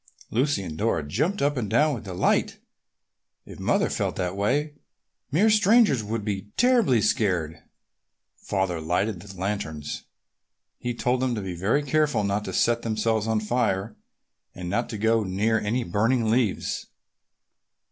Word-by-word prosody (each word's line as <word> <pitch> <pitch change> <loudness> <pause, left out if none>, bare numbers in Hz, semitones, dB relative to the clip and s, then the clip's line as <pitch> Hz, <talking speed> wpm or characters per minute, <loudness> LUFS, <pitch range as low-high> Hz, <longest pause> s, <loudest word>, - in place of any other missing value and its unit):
Lucy 125 -3 +1
and 80 -3 -7
Dora 85 -9 0
jumped 150 - 0
up 145 +1 +2
and 110 -5 -2
down 150 +7 +3
with 115 -5 -6
delight. 90 -2 0 0.9
If - - -11
Mother - - +2
felt - - -2
that 90 0 -2
way, 140 +10 0 0.6
mere 205 +10 +4
strangers 210 - +4
would 105 0 -3
be 100 -1 -3
terribly 235 - +4
scared. 90 -9 0 0.7
Father 95 -4 -2
lighted 90 +5 -1
the 95 0 -11
lanterns. 80 -7 -4 0.7
He 120 -1 -3
told 125 +1 0
them 130 -2 0
to 105 - -3
be 95 -2 -4
very 105 +12 +1
careful 145 -5 +1
not 100 +1 0
to - - -4
set 120 0 +2
themselves 110 -1 0
on 110 -1 +1
fire, 105 -2 -1 0.6
and 90 0 -5
not 120 +4 -1
to 110 - -4
go 110 +1 +2
near 105 +4 +1
any 115 +5 -1
burning 115 +4 +1
leaves. 115 -4 0
110 Hz, 150 wpm, -25 LUFS, 95-125 Hz, 0.9 s, mere